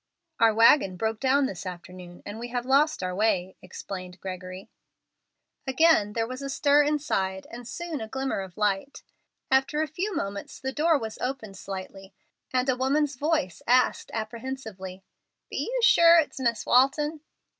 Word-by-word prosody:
"Our 225 Hz, -1 st, +6 dB
wagon 225 Hz, -3 st, +5 dB
broke 220 Hz, +2 st, -2 dB
down 275 Hz, +1 st, +3 dB
this 190 Hz, -9 st, -5 dB
afternoon, 180 Hz, -1 st, -9 dB
and 205 Hz, +2 st, -7 dB
we 240 Hz, -, -5 dB
have 245 Hz, 0 st, -3 dB
lost 280 Hz, -1 st, +2 dB
our 180 Hz, 0 st, -2 dB
way," 190 Hz, -2 st, 0 dB
explained 185 Hz, 0 st, -8 dB
Gregory. 185 Hz, +1 st, -7 dB, 1.0 s
Again 265 Hz, -7 st, +4 dB
there 225 Hz, 0 st, 0 dB
was 255 Hz, +3 st, -7 dB
a 275 Hz, -, -4 dB
stir 285 Hz, +1 st, +4 dB
inside, 235 Hz, -11 st, -1 dB
and 235 Hz, 0 st, -9 dB
soon 330 Hz, +3 st, -5 dB
a 220 Hz, -, -5 dB
glimmer 265 Hz, 0 st, -2 dB
of 190 Hz, -2 st, -8 dB
light. 210 Hz, +5 st, -1 dB, 0.5 s
After 270 Hz, +3 st, +2 dB
a -, -, -3 dB
few 365 Hz, +7 st, -3 dB
moments 200 Hz, -6 st, -5 dB
the 265 Hz, 0 st, -4 dB
door 320 Hz, +2 st, +3 dB
was 220 Hz, -4 st, -6 dB
opened 250 Hz, -6 st, -4 dB
slightly, 195 Hz, 0 st, -8 dB, 0.4 s
and 255 Hz, 0 st, +1 dB
a 260 Hz, -, +2 dB
woman's 280 Hz, +3 st, +1 dB
voice 290 Hz, -, -1 dB
asked, 250 Hz, +1 st, +3 dB
apprehensively, 220 Hz, -5 st, -6 dB, 0.5 s
"Be -, -, -3 dB
you -, -, 0 dB
sure 340 Hz, -6 st, +7 dB
it's 310 Hz, -4 st, +1 dB
Miss 235 Hz, -4 st, 0 dB
Walton?" 295 Hz, +4 st, +3 dB
240 Hz, 160 wpm, -26 LUFS, 195-280 Hz, 1.0 s, sure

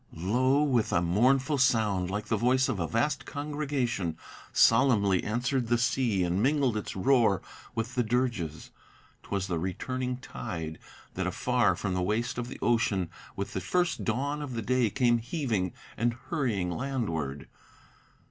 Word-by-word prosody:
Lo! 130 Hz, -, +2 dB
with 125 Hz, -7 st, +1 dB
a -, -, +3 dB
mournful 130 Hz, -, +2 dB
sound, 105 Hz, -8 st, +2 dB
like 105 Hz, +2 st, -3 dB
the 110 Hz, -, 0 dB
voice 125 Hz, +4 st, +3 dB
of 125 Hz, -7 st, -2 dB
a 85 Hz, -, -1 dB
vast 135 Hz, -, 0 dB
congregation, 140 Hz, -, -2 dB, 0.3 s
Solemnly 100 Hz, -8 st, +4 dB
answered 120 Hz, +3 st, -1 dB
the 120 Hz, +1 st, +3 dB
sea, 120 Hz, -5 st, +1 dB
and 90 Hz, +3 st, 0 dB
mingled 135 Hz, -2 st, +2 dB
its 105 Hz, -, -4 dB
roar 110 Hz, -2 st, +3 dB, 0.4 s
with 115 Hz, +2 st, -2 dB
the 125 Hz, -, +1 dB
dirges. 115 Hz, -, -1 dB, 0.5 s
'Twas 100 Hz, -2 st, -2 dB
the 85 Hz, -4 st, -2 dB
returning 125 Hz, +8 st, -3 dB
tide, 80 Hz, -, -6 dB, 0.3 s
that 95 Hz, 0 st, -2 dB
afar 105 Hz, 0 st, +2 dB
from 95 Hz, +2 st, -2 dB
the 90 Hz, -, 0 dB
waste 110 Hz, +6 st, -1 dB
of 120 Hz, -, -3 dB
the -, -, -8 dB
ocean, 105 Hz, -7 st, +1 dB, 0.2 s
With 100 Hz, +1 st, -4 dB
the -, -, -2 dB
first 175 Hz, -2 st, 0 dB
dawn 140 Hz, +6 st, -1 dB
of 135 Hz, -4 st, -5 dB
the 115 Hz, -, -3 dB
day, 125 Hz, -1 st, +2 dB
came 120 Hz, 0 st, +2 dB
heaving 115 Hz, -, -1 dB, 0.2 s
and 120 Hz, +1 st, 0 dB, 0.2 s
hurrying 105 Hz, -, 0 dB
landward. 85 Hz, -, -3 dB
115 Hz, 155 wpm, -29 LUFS, 95-130 Hz, 0.5 s, Solemnly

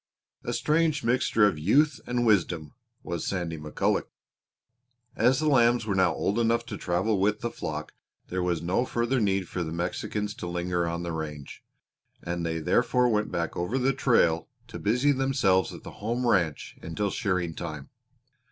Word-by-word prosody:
A -, -, -3 dB
strange 155 Hz, -1 st, +1 dB
mixture 115 Hz, -3 st, +3 dB
of 95 Hz, -7 st, +1 dB
youth 140 Hz, -, +3 dB
and 120 Hz, 0 st, 0 dB
wisdom 85 Hz, -8 st, +1 dB, 0.3 s
was 85 Hz, -2 st, -4 dB
Sandy 85 Hz, -4 st, -2 dB
McCulloch! 75 Hz, 0 st, -1 dB, 1.1 s
As 125 Hz, +4 st, +3 dB
the 155 Hz, -, 0 dB
lambs 120 Hz, -4 st, +4 dB
were 105 Hz, -, -1 dB
now 95 Hz, -2 st, +3 dB
old 105 Hz, +4 st, -1 dB
enough 115 Hz, 0 st, +2 dB
to -, -, -6 dB
travel 95 Hz, +4 st, 0 dB
with 105 Hz, +2 st, +1 dB
the 120 Hz, -, -2 dB
flock 75 Hz, -2 st, -5 dB, 0.4 s
there 90 Hz, 0 st, -2 dB
was 90 Hz, -2 st, -1 dB
no 90 Hz, +8 st, +1 dB
further 125 Hz, +1 st, 0 dB
need 95 Hz, -3 st, +1 dB
for 90 Hz, -, -3 dB
the 80 Hz, -, -5 dB
Mexicans 95 Hz, +5 st, -3 dB
to 90 Hz, -, -7 dB
linger 85 Hz, 0 st, -1 dB
on 85 Hz, +1 st, -3 dB
the 85 Hz, -, -3 dB
range, 75 Hz, -3 st, -6 dB, 0.6 s
and 85 Hz, 0 st, -3 dB
they 80 Hz, -1 st, -1 dB
therefore 125 Hz, +9 st, +2 dB
went 105 Hz, -1 st, 0 dB
back 85 Hz, -2 st, -2 dB
over 90 Hz, +9 st, -1 dB
the 135 Hz, +1 st, +2 dB
trail 115 Hz, -11 st, +2 dB, 0.2 s
to 110 Hz, -, -7 dB
busy 125 Hz, +7 st, +2 dB
themselves 130 Hz, -9 st, +2 dB
at -, -, -10 dB
the -, -, -8 dB
home 120 Hz, +4 st, -1 dB
ranch 90 Hz, -10 st, 0 dB
until 95 Hz, +5 st, -2 dB
shearing 90 Hz, -7 st, -1 dB
time. 75 Hz, -4 st, -6 dB
95 Hz, 170 wpm, -27 LUFS, 85-120 Hz, 1.1 s, lambs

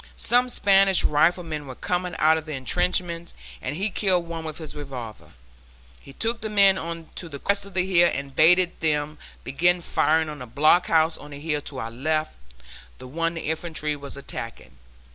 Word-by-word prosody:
Some 250 Hz, +1 st, +2 dB
Spanish 195 Hz, -4 st, +4 dB
riflemen 155 Hz, -1 st, +1 dB
were 130 Hz, -, -8 dB
coming 180 Hz, +4 st, -2 dB
out 155 Hz, +1 st, +4 dB
of 160 Hz, 0 st, -5 dB
the 155 Hz, -, -5 dB
intrenchments 170 Hz, +4 st, -1 dB, 0.3 s
and 130 Hz, +3 st, -4 dB
he 195 Hz, +5 st, -1 dB
killed 180 Hz, -3 st, +1 dB
one 165 Hz, -1 st, -5 dB
with 155 Hz, -1 st, -6 dB
his 155 Hz, -3 st, -8 dB
revolver. 130 Hz, -7 st, -8 dB, 0.7 s
He -, -, -14 dB
took 230 Hz, +10 st, -2 dB
the 220 Hz, -, -3 dB
men 200 Hz, -2 st, +5 dB
on 165 Hz, -1 st, -6 dB
to 170 Hz, -, -7 dB
the 140 Hz, -, -7 dB
crest 200 Hz, +7 st, 0 dB
of 200 Hz, -, -14 dB
the 185 Hz, -1 st, +2 dB
hill 175 Hz, -2 st, +4 dB
and 140 Hz, -1 st, -5 dB
bade 180 Hz, +2 st, +4 dB
them 150 Hz, -1 st, -1 dB, 0.2 s
begin 175 Hz, +7 st, +2 dB
firing 160 Hz, 0 st, +2 dB
on 150 Hz, -2 st, -7 dB
the 125 Hz, -, -8 dB
blockhouse 160 Hz, +4 st, +3 dB
on 145 Hz, -, -11 dB
the 145 Hz, -1 st, -9 dB
hill 150 Hz, -1 st, -2 dB
to 140 Hz, -, -7 dB
our 115 Hz, -2 st, -4 dB
left, 155 Hz, +6 st, -1 dB, 0.6 s
the 130 Hz, -, -11 dB
one 165 Hz, +5 st, -2 dB
the 165 Hz, -, -4 dB
infantry 155 Hz, -1 st, -3 dB
were 140 Hz, -1 st, -9 dB
attacking. 115 Hz, -, -8 dB
160 Hz, 185 wpm, -24 LUFS, 145-180 Hz, 0.7 s, men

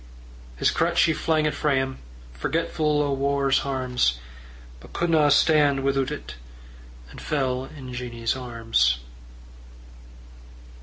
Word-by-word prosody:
His -, -, +2 dB
crutch 170 Hz, +1 st, +2 dB
he 160 Hz, -, +3 dB
flang 155 Hz, -1 st, 0 dB
it 150 Hz, -, 0 dB
frae 145 Hz, 0 st, 0 dB
him, 130 Hz, 0 st, -2 dB, 0.3 s
Forgetful 150 Hz, -, 0 dB
o' 140 Hz, -1 st, -1 dB
war's 140 Hz, 0 st, +1 dB
harms; 125 Hz, -, 0 dB, 0.6 s
But -, -, -15 dB
couldna 160 Hz, -4 st, +2 dB
stan' 145 Hz, -2 st, +4 dB
withoot 135 Hz, -1 st, +1 dB
it, -, -, -7 dB, 0.7 s
And -, -, -11 dB
fell 130 Hz, -3 st, -1 dB
in 135 Hz, -3 st, -10 dB
Jeannie's 120 Hz, -2 st, -3 dB
arms. 115 Hz, -, 0 dB
135 Hz, 115 wpm, -24 LUFS, 125-150 Hz, 0.7 s, stan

